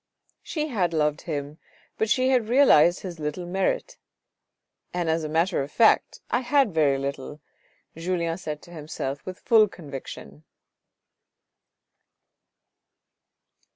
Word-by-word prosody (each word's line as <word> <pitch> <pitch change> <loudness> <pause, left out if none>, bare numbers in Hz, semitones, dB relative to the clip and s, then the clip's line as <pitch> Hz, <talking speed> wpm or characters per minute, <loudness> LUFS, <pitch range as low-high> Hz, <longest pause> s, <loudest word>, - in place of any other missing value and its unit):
She 305 -2 -3
had 185 -9 0
loved 150 0 +1
him, 145 +1 -4 0.4
but 220 - +1
she 255 +3 +3
had 245 -4 +2
realised 185 - +5
his 175 -4 -7
little 150 +4 -4
merit, 190 - -2 0.5
" - - -53
and 175 -2 -1
as 160 0 0
a 155 - -4
matter 165 +2 +1
of 140 +2 -6
fact 230 - +3
I - - +2
had 260 -4 +2
very 145 -4 +3
little," 140 +1 -5 0.6
Julien 170 0 -2
said 150 -4 -6
to 175 - -14
himself 145 -4 -5
with 185 0 -6
full 220 -2 +4
con 165 -7 -12
viction. 75 - -8
170 Hz, 130 wpm, -25 LUFS, 150-210 Hz, 0.6 s, realised